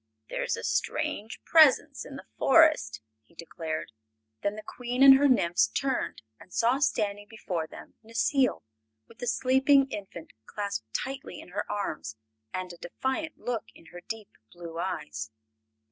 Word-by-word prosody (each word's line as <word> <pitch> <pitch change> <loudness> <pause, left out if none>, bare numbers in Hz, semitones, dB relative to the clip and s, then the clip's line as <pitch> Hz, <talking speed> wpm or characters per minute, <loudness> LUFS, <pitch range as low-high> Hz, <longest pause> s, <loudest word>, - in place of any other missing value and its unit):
"There - - -2
is - - -1
a - - -7
strange 215 +2 -2
presence 315 -5 +5
in - - -9
the - - -9
Forest," 310 - +4 0.2
he 115 - -27
declared. 160 -3 -5 0.5
Then 200 +1 -1
the 215 - -8
Queen 245 +3 -1
and 270 -1 +11
her 285 - +5
nymphs 175 - +3
turned 260 - -2 0.2
and 185 - -16
saw 240 +6 +2
standing 205 -7 0
before 180 -7 -4
them - - -12
Necile, 250 +4 +1 0.4
with 230 - -18
the 245 - -4
sleeping 265 +3 +4
infant 190 -5 -8
clasped 200 - -4
tightly 270 +1 -4
in - - -12
her 205 +3 -4
arms 155 - -3 0.4
and 185 -1 -4
a - - -12
defiant 265 - -3
look 240 -3 -3
in - - -17
her 175 - -9
deep 225 +1 -7 0.2
blue 170 -1 -8
eyes. 150 -11 -4
215 Hz, 155 wpm, -28 LUFS, 175-265 Hz, 0.5 s, and